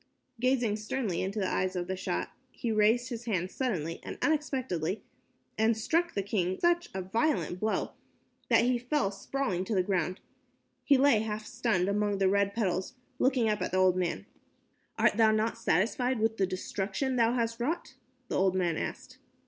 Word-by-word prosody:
Gazing 245 Hz, -4 st, +2 dB
sternly 215 Hz, -3 st, -2 dB
into 195 Hz, +3 st, -3 dB
the 195 Hz, -3 st, 0 dB
eyes 185 Hz, +1 st, -1 dB
of 175 Hz, -1 st, -1 dB
the 190 Hz, +1 st, -3 dB
Shah, 185 Hz, -, -2 dB, 0.2 s
he 235 Hz, -, -3 dB
raised 220 Hz, +3 st, +3 dB
his 240 Hz, -1 st, -6 dB
hand 185 Hz, -5 st, -1 dB
suddenly 170 Hz, -, -2 dB
and -, -, -7 dB
unexpectedly, 260 Hz, -, -1 dB, 0.6 s
and 220 Hz, 0 st, +3 dB
struck 330 Hz, +10 st, 0 dB
the 200 Hz, -, 0 dB
king 185 Hz, -2 st, -1 dB
such 345 Hz, 0 st, +2 dB
a 190 Hz, -, -2 dB
violent 225 Hz, -, 0 dB
blow 215 Hz, +2 st, -1 dB, 0.6 s
that -, -, +5 dB
he 245 Hz, -1 st, +2 dB
fell 250 Hz, -4 st, 0 dB
sprawling 195 Hz, -2 st, -2 dB
to 215 Hz, -, -2 dB
the 185 Hz, -, +3 dB
ground. 185 Hz, -1 st, -1 dB, 0.6 s
He 280 Hz, -, +5 dB
lay 265 Hz, -4 st, +5 dB
half 215 Hz, 0 st, -3 dB
stunned 200 Hz, -7 st, 0 dB
among 205 Hz, 0 st, +1 dB
the 195 Hz, -1 st, +3 dB
red 200 Hz, 0 st, +1 dB
petals, 190 Hz, 0 st, -1 dB, 0.2 s
looking 255 Hz, -3 st, +3 dB
up 210 Hz, -1 st, 0 dB
at -, -, -2 dB
the -, -, +2 dB
old 185 Hz, -1 st, +4 dB
man. 175 Hz, -, -2 dB, 0.7 s
"Art -, -, +3 dB
thou 225 Hz, -1 st, +6 dB
not 215 Hz, +1 st, +1 dB
satisfied 235 Hz, +7 st, +1 dB
with 225 Hz, +1 st, +1 dB
the 190 Hz, -, +2 dB
destruction 195 Hz, +7 st, -2 dB
thou 230 Hz, -1 st, +3 dB
hast 230 Hz, -1 st, -1 dB
wrought?" 290 Hz, +3 st, -2 dB, 0.3 s
the -, -, -1 dB
old 190 Hz, -1 st, +2 dB
man 175 Hz, -3 st, +1 dB
asked. 255 Hz, 0 st, -6 dB
215 Hz, 180 wpm, -30 LUFS, 185-245 Hz, 0.7 s, thou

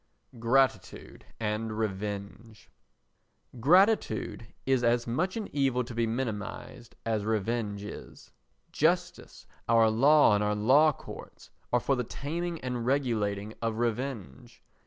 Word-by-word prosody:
Gratitude 130 Hz, +3 st, 0 dB
and 110 Hz, 0 st, -2 dB
Revenge 105 Hz, -, -5 dB, 0.9 s
Gratitude 170 Hz, -, +2 dB, 0.2 s
is 130 Hz, -2 st, +2 dB
as 120 Hz, 0 st, +2 dB
much 170 Hz, -, -1 dB
an 215 Hz, -, -4 dB
evil 135 Hz, -3 st, +1 dB
to 120 Hz, 0 st, -9 dB
be 115 Hz, 0 st, 0 dB
minimised 115 Hz, 0 st, -5 dB
as 110 Hz, -2 st, 0 dB
revenge 105 Hz, -1 st, -2 dB
is. 105 Hz, -, -10 dB, 0.4 s
Justice, 175 Hz, +3 st, -1 dB, 0.2 s
our 115 Hz, -1 st, +5 dB
law 140 Hz, +2 st, +5 dB
and 105 Hz, 0 st, +2 dB
our 105 Hz, 0 st, 0 dB
law 135 Hz, +9 st, +5 dB
courts -, -, -12 dB, 0.2 s
are 125 Hz, -, +3 dB
for 135 Hz, +3 st, 0 dB
the 125 Hz, -, -1 dB
taming 165 Hz, +7 st, -4 dB
and 125 Hz, -2 st, -3 dB
regulating 110 Hz, -6 st, -1 dB
of 115 Hz, -1 st, -2 dB
revenge. 115 Hz, -, -4 dB
115 Hz, 120 wpm, -29 LUFS, 110-135 Hz, 0.9 s, our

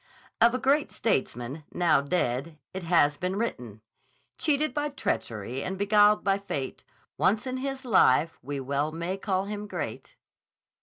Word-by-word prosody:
Of 235 Hz, +2 st, +6 dB
a -, -, +2 dB
great 280 Hz, +3 st, +2 dB
statesman, 130 Hz, -, -1 dB
now 170 Hz, -5 st, +3 dB
dead, 140 Hz, 0 st, -1 dB, 0.2 s
it 190 Hz, -, -4 dB
has 165 Hz, -4 st, +3 dB
been 185 Hz, +1 st, -2 dB
written: 125 Hz, -, -4 dB, 0.6 s
Cheated 305 Hz, 0 st, +1 dB
by 295 Hz, 0 st, -1 dB
treachery 120 Hz, -, -3 dB
and 190 Hz, -, -4 dB
beguiled 205 Hz, +1 st, +4 dB
by 195 Hz, 0 st, +2 dB
Fate, 140 Hz, -10 st, -5 dB, 0.4 s
Once 210 Hz, +4 st, +2 dB
in 255 Hz, 0 st, -3 dB
his 270 Hz, 0 st, -4 dB
life 165 Hz, -, +4 dB
we 140 Hz, +2 st, -4 dB
well 140 Hz, +3 st, -1 dB
may 170 Hz, +3 st, -3 dB
call 195 Hz, -1 st, -1 dB
him 210 Hz, 0 st, -5 dB
great. -, -, -6 dB
185 Hz, 150 wpm, -27 LUFS, 140-225 Hz, 0.6 s, Of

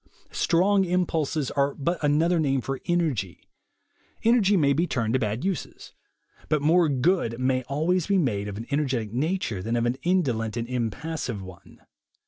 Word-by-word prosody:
Strong 195 Hz, +3 st, +3 dB
impulses 160 Hz, -5 st, -1 dB
are 140 Hz, 0 st, 0 dB
but 170 Hz, +4 st, -2 dB
another 160 Hz, +4 st, +2 dB
name 135 Hz, -3 st, +1 dB
for 135 Hz, +2 st, -4 dB
energy. 150 Hz, -, -1 dB, 0.8 s
Energy 220 Hz, -4 st, +4 dB
may 140 Hz, -4 st, +3 dB
be 170 Hz, +5 st, +1 dB
turned 115 Hz, -6 st, -1 dB
to 130 Hz, -, +2 dB
bad 110 Hz, -, -2 dB
uses; 190 Hz, -7 st, -4 dB, 0.6 s
but 155 Hz, -, +2 dB
more 160 Hz, +3 st, +3 dB
good 135 Hz, -3 st, +1 dB
may 130 Hz, 0 st, +1 dB
always 160 Hz, +5 st, 0 dB
be 200 Hz, -1 st, +2 dB
made 105 Hz, -, 0 dB
of 100 Hz, -1 st, -6 dB
an 115 Hz, -, -6 dB
energetic 130 Hz, -7 st, -1 dB
nature, 140 Hz, -, -1 dB
than 115 Hz, +5 st, -2 dB
of 120 Hz, 0 st, +1 dB
an 120 Hz, +2 st, 0 dB
indolent 125 Hz, -, 0 dB
and 115 Hz, 0 st, -3 dB
impassive 125 Hz, -1 st, -3 dB
one. 95 Hz, -1 st, -14 dB
140 Hz, 160 wpm, -25 LUFS, 120-170 Hz, 0.8 s, Energy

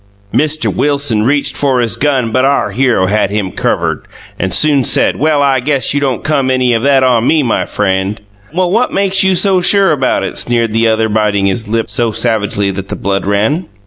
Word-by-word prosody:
Mr. 155 Hz, +1 st, 0 dB
Wilson 140 Hz, -7 st, 0 dB
reched 140 Hz, +3 st, 0 dB
for 135 Hz, -3 st, 0 dB
his 115 Hz, -3 st, -1 dB
gun 130 Hz, -2 st, 0 dB
but 130 Hz, +3 st, +1 dB
our 140 Hz, +1 st, +1 dB
hero 125 Hz, -7 st, +1 dB
had 100 Hz, +1 st, 0 dB
him 100 Hz, -2 st, -3 dB
covred -, -, -2 dB, 0.3 s
and 95 Hz, -, -2 dB
soon 145 Hz, -, +3 dB
said -, -, +2 dB
Well 150 Hz, 0 st, +1 dB
I 135 Hz, -2 st, +2 dB
guess 135 Hz, +1 st, -1 dB
you 145 Hz, -, 0 dB
don't 135 Hz, -3 st, -2 dB
come 140 Hz, -3 st, 0 dB
any 130 Hz, -1 st, +1 dB
of 115 Hz, -, 0 dB
that 135 Hz, 0 st, +3 dB
on 125 Hz, -2 st, +2 dB
me 155 Hz, -2 st, +2 dB
my 120 Hz, -, -1 dB
freind. 95 Hz, 0 st, -1 dB, 0.3 s
Well 180 Hz, +2 st, -1 dB
what 235 Hz, +5 st, +1 dB
makes 195 Hz, -1 st, 0 dB
you 190 Hz, -1 st, +2 dB
so 190 Hz, 0 st, +2 dB
sure 195 Hz, +1 st, +3 dB
about 135 Hz, -4 st, 0 dB
it -, -, -3 dB
sneered 115 Hz, -2 st, 0 dB
the 115 Hz, +1 st, +2 dB
other 110 Hz, 0 st, +1 dB
bitting 105 Hz, -2 st, 0 dB
his 100 Hz, +3 st, -1 dB
lip 115 Hz, 0 st, -1 dB
so 115 Hz, -2 st, -1 dB
savageley 105 Hz, -3 st, -1 dB
that 95 Hz, 0 st, -6 dB
the -, -, -5 dB
blood 100 Hz, 0 st, -2 dB
ran. 110 Hz, -, 0 dB
125 Hz, 210 wpm, -12 LUFS, 110-145 Hz, 0.3 s, soon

